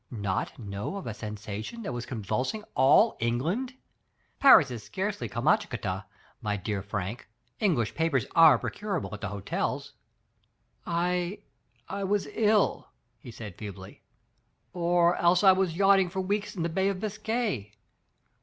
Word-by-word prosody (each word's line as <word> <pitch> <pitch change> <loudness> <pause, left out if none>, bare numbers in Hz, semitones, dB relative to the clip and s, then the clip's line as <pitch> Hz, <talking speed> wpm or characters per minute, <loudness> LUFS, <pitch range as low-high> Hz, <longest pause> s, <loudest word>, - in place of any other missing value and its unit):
*' - - -47 0.2
"Not 95 - -2
know 100 - -5
of 200 - -6
a 115 - -4
sensation 105 - -6
that 130 - -4
was 120 -1 -5
convulsing 130 - -2
all 135 - +5
England? 165 - -1 0.6
Paris 160 - +7
is 120 -3 -5
scarcely 200 - -3
Kamschatka, 120 - 0 0.3
my 105 -2 -1
dear 100 +1 -3
Frank. 100 +3 -5 0.3
English 155 - +1
papers 160 -8 +1
are 160 -6 +8
procurable 195 - -4
at 105 - -7
the 110 - -2
hotels." 100 0 -3 0.9
*'I 180 +3 -1 0.2
— 120 0 -40
I 200 +1 -4
was 200 -1 0
ill," 215 -2 +2 0.3
he 120 - -12
said 110 -5 -9
feebly, 95 -3 -9 0.7
"or 175 0 +2
else 175 +2 +3
I 190 - +9
was 185 -3 +1
yachting 195 -1 +5
for 190 +2 -4
weeks 205 +2 -2
in 170 - -2
the 170 - 0
Bay 190 +4 +1
of 195 -2 -3
Biscay. 215 - -2
165 Hz, 145 wpm, -28 LUFS, -, 0.9 s, I